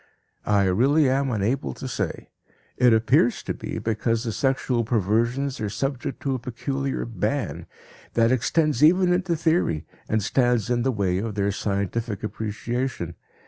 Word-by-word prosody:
I 105 -1 +4
really 130 +11 +3
am 135 +1 +1
unable 115 +4 -1
to 130 - -6
say. 100 -8 -4 0.4
It 125 -1 +5
appears 115 +2 +3
to - - -2
be - - -6
because 115 +1 -1
the 115 - -2
sexual 130 -1 0
perversions 115 +5 0
are 105 - -1
subject 135 +6 -3
to 135 - 0
a 130 - -2
peculiar 135 +3 -3
ban 115 +4 -2 0.5
that 115 0 +4
extends 145 +3 +1
even 180 +3 +5
into 180 -1 0
theory, 160 - +1 0.2
and 110 -1 +1
stands 120 -1 +1
in 120 -1 +2
the 130 +2 +1
way 95 -5 0
of 110 0 -4
their 100 0 +1
scientific 100 +2 -2
appreciation. 110 -3 -3
120 Hz, 150 wpm, -24 LUFS, 105-135 Hz, 0.5 s, It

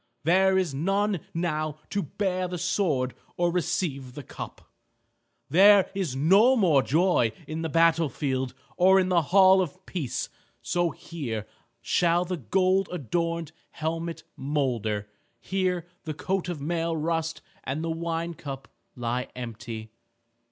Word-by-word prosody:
There 190 +4 +4
is 180 -6 0
none 195 +6 +1
now 155 -3 -2
to 200 - 0
bear 185 +3 -2
the 180 0 -4
sword 145 -9 0 0.2
or 175 0 +2
receive 140 -7 -2
the 145 - -7
cup. - - -9 0.8
There 200 +3 +6
is 185 -9 -2
no 195 - +5
more 170 - +4
joy 155 - +2
in 155 +1 -4
the 160 - -2
battle 165 0 +3
field 130 -1 -2 0.2
or 190 +1 +6
in 185 -1 +1
the 175 -2 +4
hall 190 +4 +6
of 185 +2 -5
peace. 155 -10 -3 0.4
So 175 -1 +1
here 120 -12 -5 0.4
shall 175 0 +2
the 180 0 -3
gold 185 - +1
adorned 170 0 -2 0.2
helmet 165 +1 -4
molder, 120 -8 -1 0.3
here 185 -3 -1 0.2
the 155 -2 -4
coat 190 +2 -2
of 175 -4 -4
mail 165 +2 -1
rust 165 +1 -2 0.2
and 140 +4 -3
the 165 - -1
wine 165 +1 -2
cup 135 -3 -8 0.3
lie 125 0 -2
empty." 115 -2 -7
165 Hz, 135 wpm, -27 LUFS, 140-185 Hz, 0.8 s, There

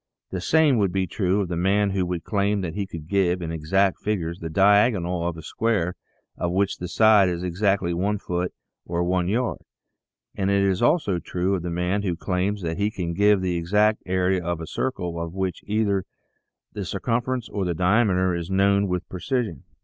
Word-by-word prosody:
The 95 - -3
same 150 - +3
would 100 -3 +2
be 95 0 0
true 95 +1 0
of 95 - -2
the 85 - -3
man 100 +3 +2
who 95 -2 0
would 85 -2 -3
claim 100 -1 0
that 85 -4 -4
he 100 -1 -3
could 80 -4 -8
give, 95 -1 +1
in 85 -2 -4
exact 90 +5 +1
figures, 85 -5 -2
the 80 - -5
diag 100 +7 +5
onal 85 -1 -2
of 85 - -7
a 80 - -9
square 105 -6 0 0.4
of 85 - -2
which 100 +2 0
the 90 - -4
side 105 0 +5
is 90 0 -3
exactly 90 0 0
one 100 +5 0
foot 90 -1 -3 0.3
or 85 0 -2
one 90 0 0
yard, 120 +5 -1 0.7
and 95 0 -1
it 100 0 +3
is 95 -1 +1
also 120 - +2
true 90 +3 -1
of 95 - -1
the 90 - -4
man 90 +4 -1
who 90 -4 -1
claims 95 +3 -2
that 80 +1 -3
he 100 +1 +2
can 90 -5 -4
give 100 +2 +4
the 90 -2 -1
exact 105 +6 +2
area 90 0 +1
of 85 -1 -2
a 80 - -5
circle 90 -7 -3
of 85 +1 -5
which 95 -2 -2
either 100 -2 0 0.7
the 105 - -4
circumference 115 +6 -2
or 100 - -2
the 90 -2 -1
diameter 95 0 +2
is 85 0 -4
known 100 +1 +3
with 90 -1 -2
precision. 95 - -3
95 Hz, 205 wpm, -24 LUFS, 85-100 Hz, 0.7 s, diag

